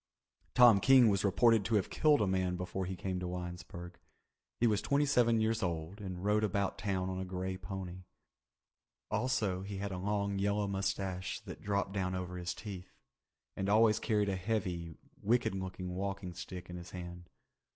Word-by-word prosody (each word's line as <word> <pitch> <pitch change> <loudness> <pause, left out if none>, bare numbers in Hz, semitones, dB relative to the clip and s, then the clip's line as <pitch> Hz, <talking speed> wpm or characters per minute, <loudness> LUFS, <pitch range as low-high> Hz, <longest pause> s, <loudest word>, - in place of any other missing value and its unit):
Tom 120 -5 +8
King 130 0 +7
was 100 -1 +1
reported 110 +2 +4
to 110 +4 0
have 100 - +1
killed 150 -6 +4
a - - +3
man 95 -1 +1
before 90 +1 -3
he 95 - -3
came 95 0 -3
to 90 - -3
Winesburg. 90 0 -7 0.6
He 120 - +3
was 105 -3 +3
twenty 140 +1 +2
seven 120 -5 +3
years 110 0 +1
old 85 +2 -3
and 95 -1 -5
rode 105 +1 +3
about 100 -1 0
town 95 -2 -1
on 95 0 -3
a - - -2
grey 95 0 -3
pony. 95 -1 -7 1.1
Also 105 -7 0
he 100 0 -6
had 100 +1 -3
a 90 - -4
long 100 0 -1
yellow 100 +1 +1
mustache 95 -1 -2
that - - -9
dropped 100 -1 -1
down 95 -2 -1
over 90 0 -4
his 90 +1 -3
teeth, 95 -4 -8 0.6
and 95 0 -2
always 110 0 +5
carried 105 -2 +1
a 95 - 0
heavy, 90 -5 -2 0.2
wicked 120 0 +2
looking 95 -1 -4
walking 95 -1 -3
stick 90 +1 -7
in 90 - -7
his 85 0 -9
hand. 90 -1 -8
95 Hz, 180 wpm, -33 LUFS, 90-105 Hz, 1.1 s, Tom